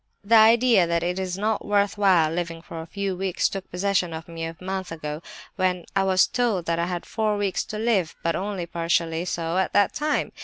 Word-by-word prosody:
"The 210 +3 0
idea 225 -3 +6
that 170 0 0
it 180 +2 -1
is 185 -1 -3
not 215 +1 -1
worth 205 -1 +1
while 185 -6 +4
living 165 -1 -4
for 165 - -7
a 160 - -9
few 200 +1 -3
weeks 190 -1 0
took 195 -1 -6
possession 180 -2 0
of 160 +1 -7
me 165 -1 -5
a 165 0 -6
month 190 -1 -4
ago, 150 -1 -5 0.4
when 180 -1 0
I 195 - +3
was 185 -1 +4
told 230 -8 0
that 170 0 0
I 170 - 0
had 175 -1 -4
four 215 -2 -1
weeks 200 -2 -1
to 215 - -6
live, 215 -7 0
but 165 -1 +1
only 195 -2 -3
partially 170 0 -1
so 170 0 -1
at 190 - -1
that 205 - +3
time. 300 0 -1
185 Hz, 220 wpm, -24 LUFS, 170-200 Hz, 0.4 s, idea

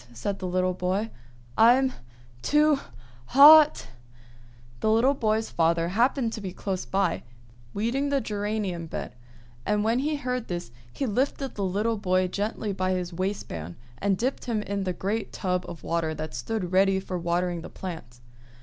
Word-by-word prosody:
said 195 - -3
the 185 - -3
little 185 0 +1
boy. 185 +5 -1 0.4
"I'm 255 +3 +5 0.5
too 300 - +3 0.5
hot!" 300 +2 +8 0.9
The 220 - +1
little 230 +5 +4
boy's 220 -4 0
father 165 0 +1
happened 235 +3 +1
to 220 - -5
be 190 -2 -5
close 190 -1 -3
by, 195 +1 0 0.5
weeding 250 +7 0
the 280 -1 +2
geranium 205 -6 -3
bed; 140 - -6 0.5
and 210 +6 +1
when 230 +3 +2
he 300 +3 0
heard 250 -4 -3
this, 175 -9 -5 0.2
he 275 - -3
lifted 265 +3 -1
the 200 - -3
little 210 +4 0
boy 185 -2 +1
gently 205 +1 -2
by 185 0 0
his 180 -1 -3
waistband, 170 - -4 0.2
and 195 -1 +1
dipped 255 +6 -2
him 225 -4 -1
in 200 -1 -3
the 185 - -1
great 205 +5 -3
tub 180 -2 -2
of 170 -2 -9
water 165 -2 -1
that 155 -1 -6
stood 180 - -3
ready 190 +1 +4
for 185 -1 -4
watering 175 0 -1
the 175 - -9
plants. 160 -10 -8
200 Hz, 160 wpm, -26 LUFS, 180-230 Hz, 0.9 s, hot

